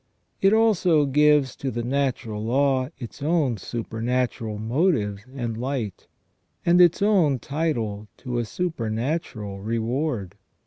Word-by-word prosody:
It 195 Hz, -, +5 dB
also 190 Hz, -9 st, +4 dB
gives 150 Hz, -1 st, +3 dB
to 135 Hz, -, -3 dB
the 120 Hz, -2 st, -3 dB
natural 120 Hz, -5 st, -1 dB
law 130 Hz, +2 st, +1 dB
its 125 Hz, +1 st, -9 dB
own 145 Hz, -6 st, +1 dB
supernatural 115 Hz, +1 st, -2 dB
motive 110 Hz, -, +1 dB, 0.2 s
and 120 Hz, -4 st, -3 dB
light, 120 Hz, -4 st, -4 dB, 0.6 s
and 175 Hz, +1 st, +5 dB
its 175 Hz, +3 st, +5 dB
own 180 Hz, -10 st, +3 dB
title 120 Hz, -9 st, -2 dB
to 125 Hz, -2 st, -3 dB
a 120 Hz, -, -1 dB
supernatural 115 Hz, -, -3 dB
reward. 115 Hz, -, -2 dB
130 Hz, 120 wpm, -24 LUFS, 110-150 Hz, 0.6 s, It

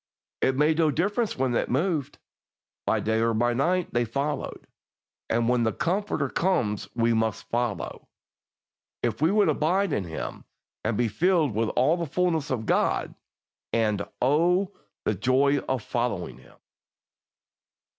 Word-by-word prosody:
It 130 Hz, 0 st, +2 dB
made 155 Hz, +2 st, +3 dB
no 160 Hz, -2 st, +4 dB
difference 205 Hz, -, 0 dB
when 130 Hz, -1 st, +1 dB
it -, -, 0 dB
moved 150 Hz, +1 st, 0 dB, 0.7 s
by -, -, +2 dB
day 110 Hz, +1 st, +1 dB
or 115 Hz, 0 st, +2 dB
by 120 Hz, +2 st, +2 dB
night, 175 Hz, +8 st, 0 dB
they 120 Hz, -, +2 dB
followed; 140 Hz, +6 st, -3 dB, 0.6 s
and 115 Hz, 0 st, +1 dB
when 125 Hz, 0 st, +3 dB
the 110 Hz, -1 st, +2 dB
Comforter 185 Hz, -4 st, -1 dB
comes 110 Hz, -, 0 dB
we 115 Hz, 0 st, +2 dB
must 110 Hz, -1 st, -1 dB
follow, 120 Hz, -3 st, -2 dB, 1.0 s
if -, -, -1 dB
we 160 Hz, -, +4 dB
would 205 Hz, 0 st, +3 dB
abide 165 Hz, +4 st, +1 dB
in 100 Hz, -, -1 dB
Him 80 Hz, -2 st, -6 dB, 0.4 s
and 110 Hz, -1 st, 0 dB
be 120 Hz, -, +2 dB
filled 160 Hz, -, +2 dB
with 110 Hz, +1 st, 0 dB
all 145 Hz, +7 st, +3 dB
the 170 Hz, -2 st, -3 dB
fullness 165 Hz, -1 st, 0 dB
of 120 Hz, -4 st, -2 dB
God. -, -, +1 dB, 0.6 s
And, 110 Hz, -3 st, +1 dB, 0.2 s
Oh, 175 Hz, +8 st, +2 dB, 0.3 s
the -, -, +2 dB
joy 140 Hz, +3 st, +2 dB
of 130 Hz, -5 st, -1 dB
following 120 Hz, -, -2 dB
Him! -, -, -19 dB
130 Hz, 145 wpm, -26 LUFS, 115-165 Hz, 1.0 s, no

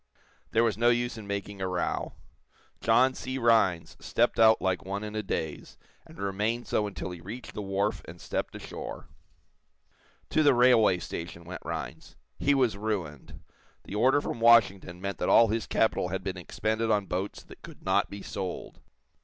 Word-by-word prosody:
There 115 Hz, -, +3 dB
was 110 Hz, -2 st, 0 dB
no 120 Hz, +1 st, +5 dB
use 120 Hz, 0 st, +1 dB
in 110 Hz, -3 st, -9 dB
making 100 Hz, 0 st, -4 dB
a 95 Hz, -, 0 dB
row. 90 Hz, -1 st, -2 dB, 0.7 s
John 125 Hz, +4 st, +4 dB
C. 130 Hz, 0 st, -5 dB
Rhinds 115 Hz, -9 st, +2 dB
stepped -, -, +1 dB
out 110 Hz, 0 st, +6 dB
like 95 Hz, -1 st, -1 dB
one 100 Hz, +2 st, -4 dB
in 105 Hz, 0 st, -6 dB
a 110 Hz, -, 0 dB
daze, 80 Hz, -6 st, -4 dB, 0.3 s
and -, -, -15 dB
remained 105 Hz, +5 st, -1 dB
so 105 Hz, -, 0 dB
until 95 Hz, -2 st, -6 dB
he 90 Hz, -2 st, -9 dB
reached 110 Hz, +8 st, -8 dB
the -, -, -5 dB
wharf 100 Hz, +1 st, -1 dB
and 85 Hz, +1 st, -11 dB
stepped -, -, -4 dB
ashore. -, -, -8 dB, 1.2 s
To 155 Hz, -, +3 dB
the 145 Hz, -4 st, +5 dB
railway 120 Hz, -6 st, +5 dB
station 85 Hz, 0 st, -7 dB
went 90 Hz, +2 st, -8 dB
Rhinds. -, -, -6 dB, 0.2 s
He 145 Hz, 0 st, +3 dB
was 125 Hz, -7 st, +2 dB
ruined. 95 Hz, -9 st, -4 dB, 0.4 s
The -, -, -10 dB
order 130 Hz, +7 st, +3 dB
from 120 Hz, -, -4 dB
Washington 100 Hz, -6 st, +4 dB
meant 100 Hz, -1 st, -4 dB
that -, -, 0 dB
all 115 Hz, -1 st, +6 dB
his 110 Hz, +1 st, -1 dB
capital 110 Hz, -5 st, +1 dB
had 95 Hz, +1 st, -4 dB
been 95 Hz, -1 st, -3 dB
expended 110 Hz, +5 st, -2 dB
on 105 Hz, -2 st, +2 dB
boats 95 Hz, +2 st, -4 dB
that -, -, -15 dB
could -, -, -13 dB
not -, -, +2 dB
be 100 Hz, 0 st, -8 dB
sold. 95 Hz, -2 st, -6 dB
105 Hz, 180 wpm, -28 LUFS, 95-115 Hz, 1.2 s, out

